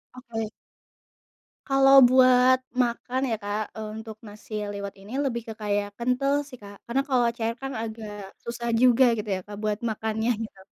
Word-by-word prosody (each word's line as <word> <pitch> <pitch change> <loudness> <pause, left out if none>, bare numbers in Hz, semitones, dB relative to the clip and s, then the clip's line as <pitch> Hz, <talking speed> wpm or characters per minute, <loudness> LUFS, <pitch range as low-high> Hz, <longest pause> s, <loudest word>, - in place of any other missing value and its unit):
Oke. 225 -4 -5 1.2
Kalau 270 0 +5
buat 255 0 +6 0.2
makan 245 +2 -2
ya - - +2
Kak, 205 +1 -1
eee, 220 -1 -5
untuk 220 -1 -8
nasi 210 +1 -12 0.2
liwet 200 -1 -6
ini 205 +5 -11
lebih 235 -3 -1
ke 220 - -5
kayak 205 -1 0
kental 250 +3 +1
sih 255 - -10
Kak, 200 0 -11
karena 260 +3 +1
kalau 245 -2 +3
cair 230 0 -1
kan 270 0 -4
agak 220 -2 -7 0.3
susah 235 0 -4
juga 255 0 +6 0.2
gitu 210 - -5
ya 185 - -3
Kak 205 -1 -8
buat 210 0 0
makannya 220 +2 -1
gitu. 195 -3 -10
230 Hz, 170 wpm, -26 LUFS, 215-255 Hz, 1.2 s, buat